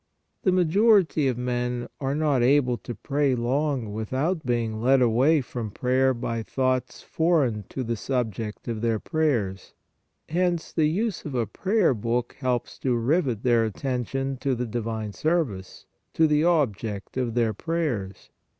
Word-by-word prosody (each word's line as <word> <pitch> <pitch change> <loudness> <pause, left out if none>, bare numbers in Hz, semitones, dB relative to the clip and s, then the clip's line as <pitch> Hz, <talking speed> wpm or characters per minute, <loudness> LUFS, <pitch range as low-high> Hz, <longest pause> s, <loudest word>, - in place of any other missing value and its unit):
The 185 - +2
majority 185 -3 +4
of 125 -3 0
men 125 0 -2
are 135 0 -1
not 150 -4 +2
able 125 0 +3
to 120 0 -7
pray 140 -2 0
long 125 -2 -1
without 135 - -1
being 115 -4 -1
led 130 +3 +4
away 130 +6 +4
from 120 -3 -5
prayer 130 +4 +2
by 115 -1 -3
thoughts 130 +1 -1
foreign 145 - +1
to 130 - -4
the 115 0 -2
subject 115 -3 -3
of 115 -2 -3
their 115 -1 +1
prayers; 115 - -1 0.5
hence 175 0 0
the 155 -2 +3
use 200 +4 -1
of 145 -4 -5
a 120 -2 +1
prayer 190 - +1
book 120 +2 -2
helps 125 -3 -2
to 125 -2 +1
rivet 125 - 0
their 120 -2 +4
attention 135 +4 -2
to 130 0 -1
the 125 +1 -2
divine 110 -2 -4
service, 145 - -2 0.3
to 160 - +5
the 150 0 +3
ob 155 - +3
ject 100 -1 -6
of 125 -3 -1
their 115 -3 +2
prayers. 125 - -3
125 Hz, 155 wpm, -25 LUFS, 115-150 Hz, 0.5 s, to